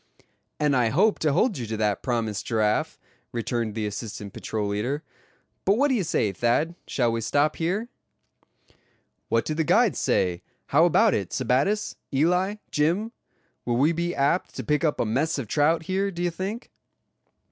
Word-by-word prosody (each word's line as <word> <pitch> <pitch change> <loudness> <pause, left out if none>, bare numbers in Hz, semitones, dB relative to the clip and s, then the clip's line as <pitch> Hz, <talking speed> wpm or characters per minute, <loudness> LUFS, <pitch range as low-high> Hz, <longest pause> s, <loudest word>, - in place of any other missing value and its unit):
"And 150 -2 +2
I 120 -3 +3
hope 200 - +3
to 155 - +2
hold 200 - +1
you 120 - -4
to 110 0 -3
that 105 -2 0
promise, 115 -4 -1
Giraffe," 110 -1 0 0.3
returned 115 -2 -2
the 110 -2 -2
assistant 105 -1 -6
patrol 105 -2 -3
leader. 125 +9 -2 0.6
"But 200 +3 +3
what 285 +3 +3
d'ye 250 -6 +2
say, 115 - 0
Thad, 120 - +1
shall 120 -3 +1
we 115 0 -2
stop 145 +6 +1
here?" 190 +8 -1 1.4
"What - - +1
do 155 - -1
the 160 +1 0
guides - - +3
say; 90 -1 +1 0.3
how 160 +4 +5
about 175 - +4
it, 95 -4 -1
Sebattis, 135 - 0
Eli, 180 +8 +2 0.2
Jim; 175 +10 +1 0.5
will 120 -1 0
we 145 +6 +4
be 170 +1 -2
apt 140 +6 0
to - - -4
pick 150 +1 0
up 155 -3 +1
a - - +1
mess 140 +9 0
of 130 -5 -4
trout 155 +7 +2
here, 190 +3 0
do 175 -2 -4
you 175 - +1
think?" 195 +7 -5
145 Hz, 170 wpm, -25 LUFS, 115-175 Hz, 1.4 s, how